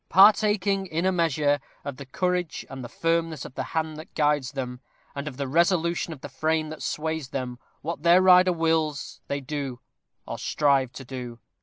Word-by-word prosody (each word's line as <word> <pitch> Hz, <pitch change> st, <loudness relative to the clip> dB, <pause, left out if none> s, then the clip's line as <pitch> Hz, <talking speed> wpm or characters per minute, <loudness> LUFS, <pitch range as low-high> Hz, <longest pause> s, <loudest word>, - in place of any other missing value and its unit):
Partaking, 200 Hz, 0 st, +5 dB
in 165 Hz, +1 st, -1 dB
a 190 Hz, -, +4 dB
measure, 150 Hz, -4 st, +2 dB, 0.3 s
of 140 Hz, -3 st, -5 dB
the 140 Hz, -, -9 dB
courage 180 Hz, +3 st, -1 dB
and 135 Hz, -1 st, -6 dB
the 120 Hz, -, -7 dB
firmness 165 Hz, -3 st, -1 dB
of -, -, -9 dB
the 130 Hz, -, -3 dB, 0.2 s
hand 160 Hz, -1 st, -1 dB
that 155 Hz, -, -11 dB
guides 145 Hz, -3 st, +1 dB
them, 125 Hz, -2 st, -4 dB, 0.3 s
and 140 Hz, +1 st, -5 dB
of 130 Hz, -4 st, -6 dB
the 140 Hz, -1 st, -2 dB
resolution 170 Hz, +3 st, +2 dB
of 145 Hz, -5 st, -8 dB
the -, -, -6 dB
frame 155 Hz, +3 st, 0 dB
that 155 Hz, -, -8 dB
sways 160 Hz, -3 st, -2 dB
them 125 Hz, -3 st, -4 dB, 0.2 s
what 165 Hz, -1 st, -4 dB
their 170 Hz, +2 st, +6 dB
rider 185 Hz, 0 st, +7 dB
wills, 160 Hz, -4 st, 0 dB
they 140 Hz, 0 st, -2 dB
do, 135 Hz, -2 st, -4 dB, 0.5 s
or -, -, -6 dB
strive 140 Hz, -4 st, +2 dB
to 135 Hz, -, -9 dB
do. 125 Hz, -2 st, -7 dB
155 Hz, 185 wpm, -26 LUFS, 135-170 Hz, 0.5 s, rider